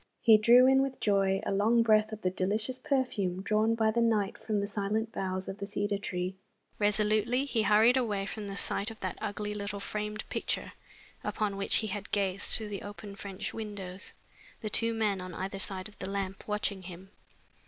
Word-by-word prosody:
He 225 -3 +7
drew 240 +4 +7
in 265 +1 +5
with 270 -1 -2
joy 195 -2 +2
a - - -1
long 220 +4 +3
breath 215 -1 +4
of 215 0 -7
the 185 - +1
delicious 215 +7 -2
perfume 205 -10 -1
drawn 215 +2 +2
by 220 -1 +2
the 235 +2 +1
night 215 -4 +2
from 215 -2 -2
the 200 - 0
silent 210 +2 -1
boughs 185 -2 -3
of 195 - -6
the 200 - -4
cedar 205 0 -1
tree. 180 -1 -3 0.4
Resolutely 215 +5 +2
he 240 -5 0
hurried 220 +4 +5
away 210 -6 0
from 210 0 -6
the 195 - -5
sight 200 +2 -1
of 225 - -10
that 185 - -4
ugly 210 0 -3
little 200 -1 -4
framed 210 +1 -4
picture - - -2 0.5
upon 210 -3 -1
which 200 0 +3
he 220 - +3
had 205 0 -5
gazed 195 -1 0
through 220 -2 -5
the 200 -2 -5
open 205 0 -8
French 195 -1 -5
windows 205 -4 -5 0.5
the 215 - -4
two 230 0 +4
men 210 -4 0
on 180 -2 -7
either 195 +1 -4
side 190 -1 -2
of 210 - -17
the 185 - -4
lamp, 195 -1 -4
watching 210 -2 -1
him. 185 +1 -10
205 Hz, 195 wpm, -30 LUFS, 195-220 Hz, 0.5 s, He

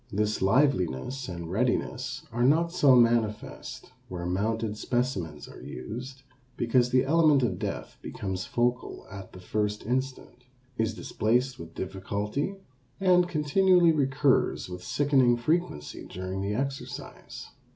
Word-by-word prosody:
This 105 +1 0
liveliness 125 - +1
and 85 -1 -6
readiness 125 +3 -1
are 120 +1 -2
not 160 +6 +3
so 145 -7 +5
manifest 115 -3 0 0.2
where 90 -1 -5
mounted 105 +4 -1
specimens 105 - -2
are - - -12
used, 125 - -7 0.3
because 120 +1 +2
the 130 +1 +3
element 150 -2 +4
of 95 -7 -1
death 100 - -5
becomes 95 -2 -4
focal 120 +3 -1
at 100 -2 -9
the 90 - -11
first 105 +3 -2
instant, 125 0 -3 0.3
is 110 -2 -1
displaced 125 +4 0
with 80 -1 -10
difficulty, 100 - -3 0.4
and 180 -2 +4
continually 175 +2 +4
recurs 140 - +1
with 90 0 -7
sickening 135 +1 +3
frequency 120 - -2
during 95 +1 -5
the 100 +1 -2
exercise. 135 +2 -6
120 Hz, 125 wpm, -28 LUFS, 100-135 Hz, 0.4 s, so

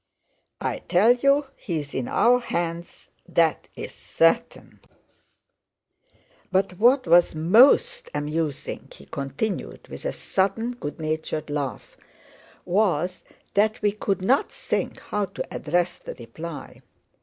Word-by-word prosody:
I - - -2
tell 200 +6 +4
you 275 +3 +3
he 170 -5 -3
is 145 -1 -8
in 130 - -2
our 245 +1 +4
hands, 170 -6 -4 0.2
that's - - +2 0.2
certain! - - 0 1.7
But 190 -1 0
what 255 +4 +5
was 175 -1 +5
most 265 - +5
amusing," 150 0 -3
he 70 - -14
continued, 140 - -4
with - - -9
a - - 0
sudden, 200 +5 -1
good 165 -13 -7
natured 155 -1 -3
laugh, 145 -2 -4 0.7
"was 180 -2 +1 0.3
that 215 +2 +2
we 205 - +4
could 195 -2 -2
not 260 +8 +2
think - - -3
how 210 -1 -2
to - - -7
address 175 +3 0
the - - -8
reply! 145 +7 -9
180 Hz, 120 wpm, -25 LUFS, 155-220 Hz, 1.7 s, what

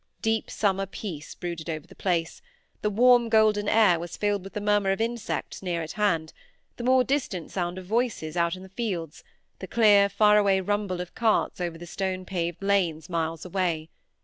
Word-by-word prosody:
Deep 225 -1 0
summer 195 -2 0
peace 175 -6 -7
brooded 170 -2 -5
over 155 -2 -4
the - - -16
place; 175 - -1 0.4
the 210 - +1
warm 240 +2 +5
golden 215 -2 +3
air 210 -7 +4
was 170 0 -7
filled 205 -2 0
with 195 - -10
the - - -3
murmur 205 -1 +2
of 195 - -1
insects 230 0 -3
near 175 -3 -2
at 160 - -6
hand, 165 -7 0 0.4
the 240 - -6
more 255 +1 +4
distant 250 - -2
sound 175 -1 -2
of 185 - -7
voices 215 -7 -1
out 170 0 +1
in 185 - -11
the 190 - -12
fields, 185 -7 -4 0.4
the 190 - -7
clear 205 -2 +5
faraway 210 -2 +4
rumble 195 -2 -1
of 180 - -8
carts 220 -4 +1
over 170 -2 -3
the 175 - -9
stone 185 +1 -3
paved 175 -1 -3
lanes 175 -5 +1
miles 165 0 -2
away. 170 -4 -2
190 Hz, 185 wpm, -26 LUFS, 170-210 Hz, 0.4 s, warm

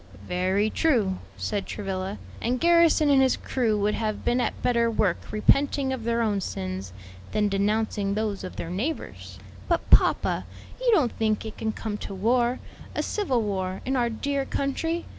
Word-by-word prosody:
"Very 190 +4 +1
true," 220 -12 +1 0.2
said 205 -2 -2
Travilla, 195 -1 -4 0.2
"and 245 +2 0
Garrison 335 -2 +5
and 270 -1 +6
his 260 -1 +3
crew 230 -5 0
would 205 +1 +1
have 215 -1 -3
been 245 +1 +2
at - - -2
better 235 -1 +3
work 210 -5 +1
repenting 275 +4 +2
of 240 -4 -5
their 235 0 +1
own 205 -3 0
sins, 95 - -4 0.4
than 210 -1 +2
denouncing 200 0 0
those 210 -2 -2
of 185 - -7
their 165 - -5
neighbors." 250 - -4 0.3
"But, - - +1
papa, - - +4 0.4
you - - +2
don't 295 - +3
think 220 -1 -1
it 220 - -8
can 220 - -1
come 215 -1 -5
to 195 - -6
war, 240 +5 +2 0.4
a - - 0
civil 265 - 0
war, 190 -2 -2
in 265 - 0
our 240 -2 +2
dear 275 +5 -1
country? 325 +6 -2
220 Hz, 170 wpm, -26 LUFS, 200-260 Hz, 0.4 s, and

